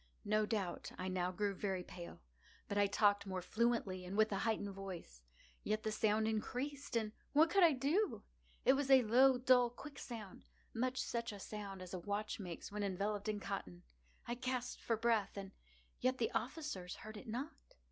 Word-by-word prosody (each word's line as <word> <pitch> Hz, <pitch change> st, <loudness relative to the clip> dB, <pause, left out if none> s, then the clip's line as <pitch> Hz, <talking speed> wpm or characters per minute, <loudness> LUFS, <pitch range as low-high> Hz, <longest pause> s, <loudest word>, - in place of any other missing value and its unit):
No 215 Hz, +1 st, +2 dB
doubt 200 Hz, -6 st, -2 dB
I 185 Hz, +1 st, -2 dB
now 180 Hz, -1 st, 0 dB
grew 200 Hz, +2 st, 0 dB
very 190 Hz, -2 st, -2 dB
pale;—but 65 Hz, -, -10 dB
I 205 Hz, 0 st, +4 dB
talked 205 Hz, 0 st, +3 dB
more 185 Hz, -1 st, -3 dB
fluently, 215 Hz, -4 st, +1 dB
and 185 Hz, +3 st, -5 dB
with 215 Hz, 0 st, +4 dB
a 195 Hz, -, 0 dB
heightened 215 Hz, -3 st, 0 dB
voice. 185 Hz, -, -7 dB, 0.4 s
Yet 215 Hz, 0 st, 0 dB
the 215 Hz, -, 0 dB
sound 215 Hz, 0 st, +2 dB
increased—and 245 Hz, +1 st, -2 dB, 0.2 s
what 320 Hz, +3 st, +6 dB
could 395 Hz, -, +5 dB
I 330 Hz, -3 st, +7 dB
do? 295 Hz, +11 st, +1 dB, 0.4 s
It 260 Hz, -, +7 dB
was 275 Hz, 0 st, 0 dB
a 265 Hz, -2 st, +8 dB
low, 255 Hz, +4 st, +6 dB
dull, 250 Hz, -1 st, +5 dB
quick 275 Hz, +4 st, -10 dB
sound—much 235 Hz, +3 st, -5 dB
such 235 Hz, -1 st, -2 dB
a 205 Hz, -, -8 dB
sound 195 Hz, -2 st, -6 dB
as 180 Hz, -, -9 dB
a 185 Hz, -, -2 dB
watch 205 Hz, +4 st, -2 dB
makes 180 Hz, -2 st, -6 dB
when 210 Hz, 0 st, -3 dB
enveloped 205 Hz, +2 st, -1 dB
in 210 Hz, -1 st, -1 dB
cotton. 90 Hz, -, -5 dB, 0.4 s
I 240 Hz, -, -1 dB
gasped 250 Hz, 0 st, -3 dB
for 230 Hz, -, 0 dB
breath—and 210 Hz, -4 st, 0 dB, 0.5 s
yet 255 Hz, +1 st, +2 dB
the 230 Hz, -, 0 dB
officers 235 Hz, -, -3 dB
heard 215 Hz, 0 st, -9 dB
it 210 Hz, -, -9 dB
not. 260 Hz, +8 st, -3 dB
215 Hz, 175 wpm, -38 LUFS, 195-245 Hz, 0.5 s, a